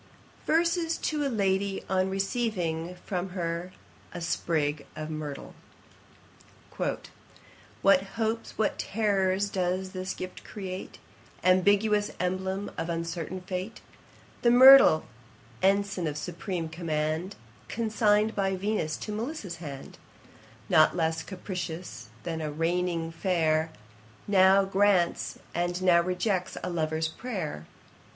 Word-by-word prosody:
] - - -27
VERSES 335 0 +2
to 300 -1 -1
a 280 - 0
LADY, 195 -3 0
on 190 0 +1
receiving 190 -4 -2
from 185 -1 -2
her 170 +1 -3 0.4
a - - -3
SPRIG 155 -3 -1
of 155 0 -5
MYRTLE. 150 -2 -6 2.3
'What 195 -1 +6
hopes, 225 0 -2
what 215 - 0
terrours 200 -2 +1
does 185 0 -1
thy 185 -1 -5
gift 185 0 -7
create, 190 -3 -7 0.5
Ambiguous 205 +3 +3
emblem 190 +2 -2
of 165 - -3
uncertain 170 +1 -3
fate: 185 +3 -5 0.6
The 240 - +4
myrtle, 260 -8 +9 0.6
ensign 195 -2 +2
of 150 -1 -3
supreme 175 +1 -4
command, 160 +2 -2 0.3
Consign'd 215 -1 +2
by 195 -1 +1
Venus 190 -5 -1
to 215 - -6
Melissa's 215 - -4
hand; 145 -5 -9 0.7
Not 155 +2 +5
less 160 -1 0
capricious 180 -1 -6
than 165 -2 -3
a 155 -1 -3
reigning 165 +1 -1
fair, 160 -2 +1 0.6
Now 195 0 +5
grants, 195 -3 +2 0.2
and 175 +1 -1
now 175 -2 +6
rejects 185 +1 -1
a 180 - -2
lover's 160 -1 0
prayer. 160 - -5
185 Hz, 115 wpm, -28 LUFS, 165-205 Hz, 2.3 s, myrtle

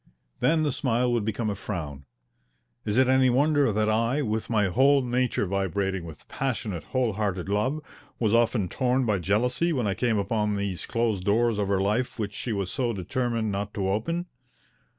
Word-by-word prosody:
Then 160 -1 +3
the 150 - +1
smile 125 -2 0
would 120 -3 +1
become 110 0 -1
a - - -1
frown. 80 -9 -6 0.8
Is 105 +2 0
it 130 -1 +5
any 130 0 +4
wonder 145 0 +3
that 105 +1 +1
I, 115 +6 +1
with 110 -2 -2
my 110 -3 +2
whole 135 +8 +4
nature 125 -3 0
vibrating 95 -1 -1
with 80 -3 -11
passionate, 110 -9 -3
whole 125 -4 0
hearted 95 -4 -2
love, 105 +9 0 0.4
was 110 -2 +1
often 115 -4 +2
torn 130 +5 0
by 105 -4 +1
jealousy 125 - +1
when 130 -8 0
I 100 - +1
came 115 +1 0
upon 105 +1 0
those 100 -5 -3
closed 115 -5 0
doors 110 +2 +2
of 100 - 0
her 100 -1 +1
life 105 +6 0
which 105 -2 -3
she 120 - -4
was 100 -3 -2
so 125 -4 -1
determined 115 +2 -2
not 100 +1 -4
to 95 -2 -1
open? 165 - -1
110 Hz, 185 wpm, -26 LUFS, 100-125 Hz, 0.8 s, it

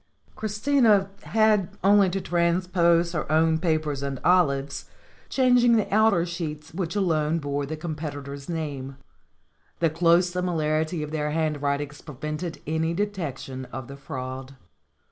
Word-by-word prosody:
Christina 215 -2 +2
had 215 -4 +2
only 200 0 +5
to 195 +2 -2
transpose 170 -1 +2
her 155 -3 -3
own 160 0 +3
papers 155 -4 0
and 140 -2 -3
Olive's, 140 -6 +2 0.4
changing 245 -2 +4
the 220 - +1
outer 215 -5 +4
sheets 160 -2 -6
which 180 +1 -3
alone 165 -5 +1
bore 145 -2 -2
the 155 +2 -4
competitor's 145 -3 -6
name. 140 -5 -4 0.8
The 165 -2 +1
close 170 +2 +4
similarity 160 -2 -1
of 150 - -6
their 150 -1 -1
handwritings 145 -2 -1
prevented 150 +3 -6
any 160 +2 -1
detection 155 -10 -4
of 125 0 -8
the 140 - -9
fraud. 130 -1 -7
160 Hz, 125 wpm, -25 LUFS, 145-180 Hz, 0.8 s, only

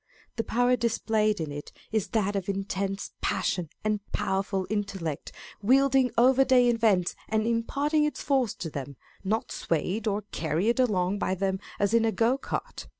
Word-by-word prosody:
'The 225 - 0
power 245 +2 +2
displayed 220 -3 +1
in 155 -3 -3
it 145 0 -7 0.2
is 220 -3 0
that 205 -3 0
of 195 -1 -2
intense 195 0 -2
passion 175 -4 -1
and 215 -1 +1
powerful 195 -2 -1
intellect, 195 -8 -3 0.3
wielding 265 +3 +4
every 260 +3 +6
day 250 -2 +5
events, 215 -7 +2 0.2
and 220 0 +1
impart 235 +6 -1
ing 305 -1 +5
its 300 - -1
force 265 -6 +1
to 160 - -6
them, 140 -1 -6 0.3
not 215 +3 -1
swayed 180 +7 -1
or 210 0 0
carried 170 - 0
along 200 -5 +1
by 185 - 0
them 190 0 -1 0.2
as 205 +1 +1
in 230 -1 +4
a 225 - +2
go 230 +3 +2
cart. 275 - -5
215 Hz, 165 wpm, -27 LUFS, 190-235 Hz, 0.3 s, every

